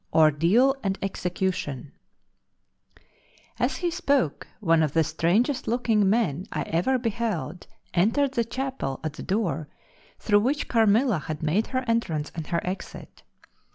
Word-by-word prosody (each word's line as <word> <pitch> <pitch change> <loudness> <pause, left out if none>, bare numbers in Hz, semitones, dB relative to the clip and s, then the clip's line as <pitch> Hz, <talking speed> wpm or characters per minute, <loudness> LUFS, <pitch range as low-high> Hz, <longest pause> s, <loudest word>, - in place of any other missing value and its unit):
Ordeal 165 - +4
and 195 -1 -1
Execution 180 -8 -3 1.7
As - - 0
he 350 -1 -1
spoke 285 - 0
one 165 -5 +3
of 150 -3 0
the 165 - +4
strangest 205 - +1
looking 225 -4 +2
men 195 -7 0
I - - -2
ever 180 +11 +1
beheld 220 -8 -3 0.3
entered 230 +10 +2
the 240 -4 +1
chapel 255 - -4
at 155 -2 -3
the - - -9
door 185 -6 -1 0.5
through 205 -1 +3
which 270 +8 0
Carmilla 225 - +3
had 155 +1 -6
made 180 +9 +1
her 255 -1 -2
entrance 170 -10 -1
and 160 -3 -6
her 170 - 0
exit. 185 +2 -7
195 Hz, 135 wpm, -26 LUFS, 160-240 Hz, 1.7 s, Ordeal